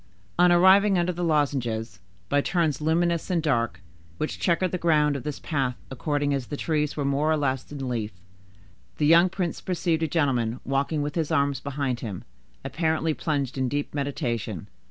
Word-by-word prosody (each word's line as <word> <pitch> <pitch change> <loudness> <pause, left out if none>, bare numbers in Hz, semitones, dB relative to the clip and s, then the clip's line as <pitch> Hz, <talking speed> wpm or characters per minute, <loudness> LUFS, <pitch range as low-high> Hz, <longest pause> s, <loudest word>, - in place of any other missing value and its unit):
On 180 0 +6
arriving 190 +3 +6
under 175 +1 +1
the 175 +1 -4
lozenges, 135 -8 0 0.3
by 145 +7 +2
turns 155 -4 0
luminous 170 +2 +1
and 180 -2 +1
dark, 115 - 0 0.4
which 155 - -3
checkered 180 0 +1
the 180 - -2
ground 150 -3 +3
of 140 - -3
this 150 +2 -4
path 135 -6 -1
according 145 +2 -1
as 135 -3 -2
the 145 - -5
trees 150 -2 -1
were 145 - -1
more 140 +3 +1
or 155 - +2
less 135 -2 -2
in 135 -2 -5
leaf, 115 -4 -2 0.9
the 150 - +1
young 170 +4 +6
prince 180 -2 -3
perceived 170 -3 -1
a 160 - +1
gentleman 130 -7 0
walking 140 +3 0
with 145 0 -3
his 160 -3 -1
arms 140 -4 +1
behind 135 -3 -2
him, 100 -6 -6 0.4
apparently 160 +3 0
plunged 140 -4 -2
in 130 - +1
a - - -2
deep 145 +1 -3
meditation. 120 - -3
145 Hz, 180 wpm, -25 LUFS, 135-165 Hz, 0.9 s, On